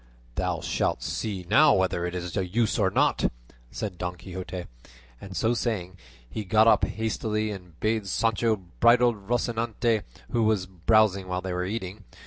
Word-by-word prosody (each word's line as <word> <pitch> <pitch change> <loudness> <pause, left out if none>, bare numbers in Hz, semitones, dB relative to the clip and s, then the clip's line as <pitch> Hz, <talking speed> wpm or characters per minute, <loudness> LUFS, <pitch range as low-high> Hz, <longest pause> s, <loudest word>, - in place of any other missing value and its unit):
"Thou - - -1
shalt - - -1
see 95 -5 -3
now 105 - +6
whether 90 -2 +1
it 90 - -5
is 90 -1 -4
of 95 -1 -2
use 115 -1 +2
or 95 -2 +3
not," - - +2 0.4
said 95 - -5
Don 90 0 -3
Quixote; 90 0 -7 0.6
and 95 -2 -7
so 115 +6 +2
saying, 100 -7 -2 0.3
he 85 - -5
got 110 +3 +4
up - - +5
hastily 110 -1 -2
and 90 -5 -10
bade 110 -2 0
Sancho 115 +3 +1 0.2
bridle 120 +1 +5
Rocinante, 115 +1 0 0.3
who 120 - +1
was 110 -4 +2
browsing 95 +1 +2
while 90 0 -2
they 95 -1 -3
were 90 0 -1
eating. 100 0 -5
100 Hz, 160 wpm, -26 LUFS, 90-110 Hz, 0.6 s, now